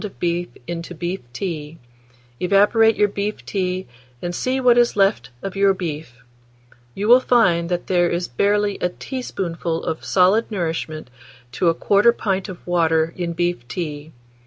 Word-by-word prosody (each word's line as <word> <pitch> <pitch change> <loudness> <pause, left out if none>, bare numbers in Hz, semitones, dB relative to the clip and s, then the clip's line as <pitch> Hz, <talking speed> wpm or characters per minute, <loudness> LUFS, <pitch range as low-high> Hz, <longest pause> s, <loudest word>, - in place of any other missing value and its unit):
of 210 - -8
beef 175 0 -1 0.2
into 170 +2 -6
beef 175 +3 -3
tea; 155 +1 -5 0.6
evaporate 205 +4 +4
your 210 - +3
beef 205 +1 -4
tea, 185 -1 -2 0.3
and 175 +4 -4
see 255 +8 -1
what 250 -2 +5
is 240 0 +3
left 195 - +2
of 195 -1 -5
your 195 0 +3
beef: 150 -9 -6 0.7
you 205 - -2
will 245 +2 +8
find 175 -10 +2
that 175 -1 -2
there 175 -2 +2
is 175 +1 -2
barely 205 +9 +1
a 180 - +1
teaspoonful 175 -8 -4
of 160 - -3
solid 195 +5 +3
nourishment 165 - -3 0.4
to 165 +8 +2
1/4 205 +7 +3
pint 195 -1 -1
of 185 - -10
water 165 -2 +1
in 175 -2 -3
beef 175 -7 -2
tea. 150 +1 -5
180 Hz, 155 wpm, -21 LUFS, 165-205 Hz, 0.7 s, will